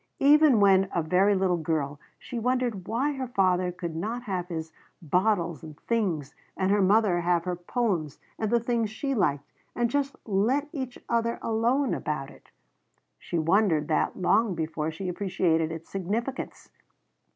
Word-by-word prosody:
Even 290 -3 +6
when 195 -1 +5
a 170 - +1
very 190 +5 +3
little 185 -2 +1
girl 150 -3 -2 0.2
she 240 - -6
wondered 245 -5 -1
why 255 +7 0
her 265 -2 -4
father 185 -5 +1
could 170 -2 -6
not 225 +8 -3
have 185 -6 -3
his 160 -2 -5 0.3
bottles 175 -1 0
and 155 -2 -11
things, 180 - -1 0.2
and 190 0 +1
her 205 0 +3
mother 195 -2 +3
have 170 -1 +1
her 180 0 -2
poems 175 - -2 0.2
and 220 - 0
the 235 +1 +3
things 235 -2 0
she 275 +6 -3
liked, 145 - 0 0.2
and 240 -1 0
just 280 0 0
let 230 +8 +1
each 260 -5 -5
other 230 0 0
alone 235 +4 +1
about 135 -3 -3
it. - - -19 0.7
She 170 - -4
wondered 165 -2 +2
that 155 - 0
long 200 +2 +2
before 160 -1 -2
she 165 +4 -6
appreciated 175 -3 0
its 165 0 -7
significance. 215 +8 -4
195 Hz, 160 wpm, -27 LUFS, 170-235 Hz, 0.7 s, Even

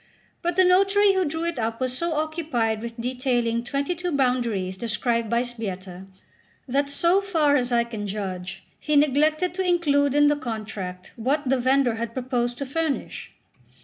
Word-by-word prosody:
But 345 -1 -1
the 375 0 +5
notary 390 +2 +4
who 375 -1 +2
drew 320 +2 -3
it 335 -6 -2
up 225 0 -2
was 255 -1 -1
so 340 +4 -1
occupied 300 -8 -1
with 235 0 -7
detailing 245 -1 0
twenty 280 +6 -1
two 355 0 -3
boundaries 240 - 0
described 230 +2 -1
by 235 +1 +2
Sbietta, 190 -6 -6 0.6
that, 280 +2 0
so 340 +7 +2
far 320 -7 +2
as 250 -3 0
I 235 -1 +3
can 220 -3 -6
judge, 190 -2 -5 0.2
he 300 - -1
neglected 300 +5 +3
to 380 +1 -1
include 290 -6 +2
in 290 0 +5
the 295 0 +4
contract 215 -8 -6
what 270 +5 0
the 265 0 +2
vendor 260 -1 +3
had 230 0 -4
proposed 245 -2 -1
to 280 - -4
furnish. 305 +1 -3
255 Hz, 170 wpm, -24 LUFS, 230-310 Hz, 0.6 s, the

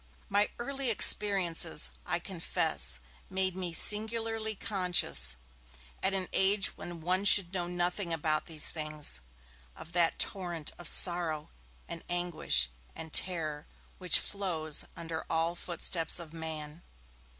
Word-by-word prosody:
My 205 +1 +2
early 270 +1 -3
experiences, 190 -7 +3 0.2
I 175 - 0
confess, 170 - -1 0.3
made 190 -1 -1
me 185 -2 -2
singularly 220 +3 0
conscious, 180 - 0 0.7
at 195 +1 +1
an 185 -1 -2
age 195 +1 +3
when 175 -1 -9
one 185 +4 0
should 195 -3 +6
know 175 -2 -2
nothing 180 +1 -2
about 155 -1 -1
these 155 -3 +1
things, 155 - -3 0.5
of 165 - -12
that 170 -1 +2
torrent 175 -5 -1
of 175 - -7
sorrow 170 -4 +5 0.4
and 170 -1 -8
anguish 175 - +1 0.3
and 160 -1 -9
terror 155 -5 -1 0.3
which 180 -2 +5
flows 165 -7 -1
under 165 -1 -5
all 165 +1 0
footsteps 170 -1 -2
of 165 -2 -7
man. 160 -1 -7
175 Hz, 125 wpm, -30 LUFS, 160-190 Hz, 0.7 s, should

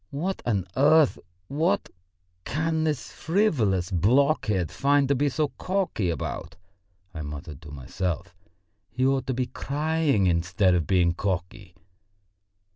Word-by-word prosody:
"What 180 +7 -3
on 100 -6 +1
earth, 150 +2 +4 0.3
what, 160 +6 0 0.5
can 160 +2 -1
this 150 -5 -2
frivolous 125 - +1
blockhead 105 - +2
find 140 0 +2
to 140 - +3
be 145 +2 +1
so 150 +2 0
cocky 185 - -1
about?" 80 -5 -4 0.6
I 80 - -6
muttered 75 0 -7
to 75 - -11
myself. 85 +6 -4 0.6
"He 130 +1 -1
ought 135 0 +1
to 130 - -1
be 130 0 0
crying 150 -6 0
instead 90 +2 +2
of 85 -4 0
being 90 -3 +3
cocky." 90 0 -4
120 Hz, 125 wpm, -26 LUFS, 90-150 Hz, 0.6 s, earth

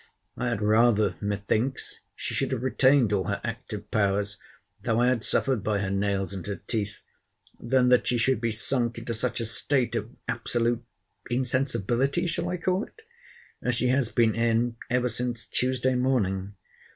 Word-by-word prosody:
I 125 - -1
had 115 -3 -2
rather, 110 -1 +4
methinks, 105 +5 -1 0.2
she - - -4
should - - -1
have 115 - -3
retained 130 -3 +4
all 95 -2 +1
her 100 0 -1
active 115 -3 -6
powers, 100 0 0 0.4
though 115 +2 +1
I 125 +1 +4
had 125 -3 0
suffered 130 -7 +2
by 105 -1 +1
her 100 -1 -2
nails 100 0 0
and 95 -3 -5
her 100 - -2
teeth, 105 +2 -3 0.6
than 125 +1 +2
that 125 - +4
she 125 - +3
should 115 0 +2
be 115 -1 0
sunk 120 +1 -1
into 115 0 -4
such 120 +3 -1
a 115 - -1
state 125 +3 +1
of 105 - -2 0.2
absolute—insensibility 120 - -1
(shall 170 +1 -1
I 180 - -2
call 185 +3 0
it?) 445 - -20 0.6
as 125 -1 0
she 125 +1 +2
has 130 -3 +1
been 115 0 +3
in 115 +1 +1
every 125 0 +2
since 120 -2 -2
Tuesday 130 0 0
morning. 100 -7 0
115 Hz, 165 wpm, -27 LUFS, 105-125 Hz, 0.6 s, rather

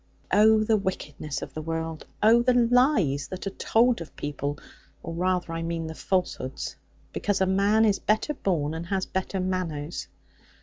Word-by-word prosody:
'Oh, 215 +1 +6
the 215 0 +3
wickedness 150 -7 -4
of - - -8
the 155 - -5
world! 165 0 -4 0.2
Oh, 230 +2 +6
the 250 +1 +3
lies 240 - +3
that 185 +1 -7
are 195 - -2
told 230 +2 +2
of 165 - -9
people 145 0 -3 0.5
or 165 - -5
rather 180 0 0
I 165 - -3
mean 165 0 -3
the 160 - -5
falsehoods 170 -7 -2 0.4
because 205 -2 0
a 190 - +3
man 200 +4 +3
is 205 -2 +2
better 220 +8 +1
born, 160 - -1
and 165 +1 -5
has 190 0 -1
better 190 +1 -3
manners! 175 -4 -3
185 Hz, 170 wpm, -26 LUFS, 160-215 Hz, 0.5 s, Oh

